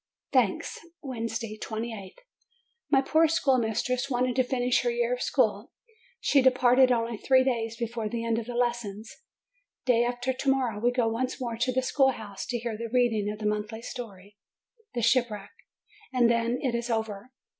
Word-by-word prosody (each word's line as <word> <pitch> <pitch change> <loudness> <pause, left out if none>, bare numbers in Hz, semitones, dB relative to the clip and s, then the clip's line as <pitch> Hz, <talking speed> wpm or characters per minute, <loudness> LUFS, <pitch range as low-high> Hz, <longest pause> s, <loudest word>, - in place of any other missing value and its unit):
THANKS 240 -8 +1 0.2
Wednesday, 230 -4 -4
28th. 220 -3 -5 0.7
My 270 -2 +4
poor 320 +3 +4
schoolmistress 255 -3 +1
wanted 250 -1 0
to 255 - +3
finish 250 -1 +1
her 485 - 0
year 480 +1 0
of - - -3
school: - - 0 0.5
she 285 - +3
departed 255 0 +5
only 230 -1 0
three 260 +3 +4
days 230 -3 -1
before 230 -2 -3
the 230 +1 -3
end 230 0 +1
of 230 - -7
the 245 - -5
lessons. 235 -3 -2 0.7
Day 240 -2 +4
after 245 +2 -1
to 270 +2 -1
morrow 255 -6 +1
we 240 +3 +3
go 245 -2 +1
once 250 +3 -2
more 240 -3 -3
to 245 +2 +1
the 260 +1 0
schoolroom 255 -7 +1
to 240 +5 -3
hear 235 -1 -4
the 230 +1 -5
reading 230 -5 +2
of 210 - -6
the 210 - -6
monthly 210 +2 -2
story, 205 -6 -9 0.6
The 240 - -1
Shipwreck, 230 -4 +1 0.6
and 245 -2 +4
then 235 +1 +1
it 255 -3 0
is 235 +1 -2
over. 220 -1 -3
240 Hz, 170 wpm, -27 LUFS, 225-255 Hz, 0.7 s, departed